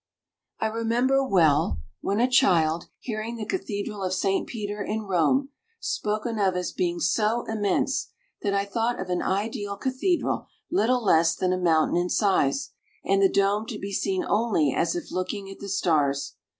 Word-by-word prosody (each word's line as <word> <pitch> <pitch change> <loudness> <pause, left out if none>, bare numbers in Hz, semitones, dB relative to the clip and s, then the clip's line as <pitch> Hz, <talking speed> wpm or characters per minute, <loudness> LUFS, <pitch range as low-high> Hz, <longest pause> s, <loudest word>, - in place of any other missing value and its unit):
I - - 0
remember 235 +5 +1
well, 155 - +3 0.2
when 200 +2 -1
a 245 - +4
child, 170 -11 +3
hearing 225 0 -4
the 220 -2 -5
Cathedral 210 - -4
of 185 -1 -1
St. 195 +1 0
Peter, 210 -3 -5
in 215 +2 -2
Rome, 195 - +2 0.3
spoken 215 +2 -2
of 190 -2 +2
as 180 -1 -2
being 350 -1 -1
so 230 -5 +1
immense 215 +4 0 0.3
that 205 - 0
I 200 0 +1
thought 230 +4 -1
of 190 -1 -4
an 180 - 0
ideal 205 +1 -2
cathedral 270 - -1 0.2
little 250 -7 +2
less 165 -4 +4
than 185 -1 0
a - - 0
mountain 165 -2 +3
in 175 0 0
size, 200 - +1 0.3
and 195 0 +3
the 195 - +5
dome 200 +3 +1
to - - -5
be 200 0 -6
seen 190 -1 0
only 205 - +2
as 165 - 0
if 175 - -5
looking 195 +2 -3
at 195 - -11
the 200 - -7
stars. 150 -8 +1
200 Hz, 170 wpm, -26 LUFS, 185-230 Hz, 0.3 s, the